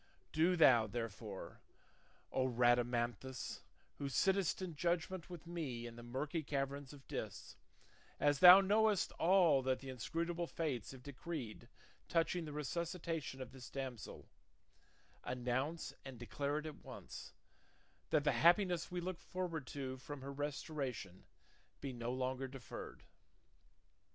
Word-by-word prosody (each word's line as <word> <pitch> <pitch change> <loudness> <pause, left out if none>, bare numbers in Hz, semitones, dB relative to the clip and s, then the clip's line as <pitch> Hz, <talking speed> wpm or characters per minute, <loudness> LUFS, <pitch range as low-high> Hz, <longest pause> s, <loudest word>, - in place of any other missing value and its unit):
Do 170 +4 +4
thou, 125 -9 +7
therefore, 110 -2 -5 0.7
O 130 0 +2
Rhadamanthus, 120 0 +1 0.4
who 140 - -2
sittest 190 +6 +2
in 185 -4 -4
judgment 175 +2 -1
with 175 -2 -8
me 150 -9 -4
in 120 -1 -7
the 120 - -9
murky 135 +7 -2
caverns 140 -1 -2
of 140 -3 -13
Dis, - - -5 0.6
as 145 -1 +3
thou 180 +3 +12
knowest 210 0 +3
all 175 -5 +6
that 130 0 +1
the 135 - -9
inscrutable 170 +7 -2
fates 145 -11 -2
have 130 -2 -10
decreed 135 -5 -6 0.4
touching 165 0 +1
the 150 - -6
resuscitation 160 -2 -3
of 125 - -11
this 130 -2 -10
damsel, 130 -5 -6 1.0
announce 125 +6 -2
and 135 -2 -8
declare 130 +6 -2
it 155 - -3
at 155 -2 -8
once, - - -9 0.8
that 150 -2 +3
the 145 - +4
happiness 170 - +4
we 180 0 -3
look 180 0 -3
forward 170 -7 -4
to 130 -2 -4
from 135 +2 -7
her 140 +1 -5
restoration 140 - -4 0.5
be 135 -2 -4
no 120 0 -3
longer 130 +1 -1
deferred." 130 -3 -8
140 Hz, 130 wpm, -38 LUFS, 125-170 Hz, 1.0 s, thou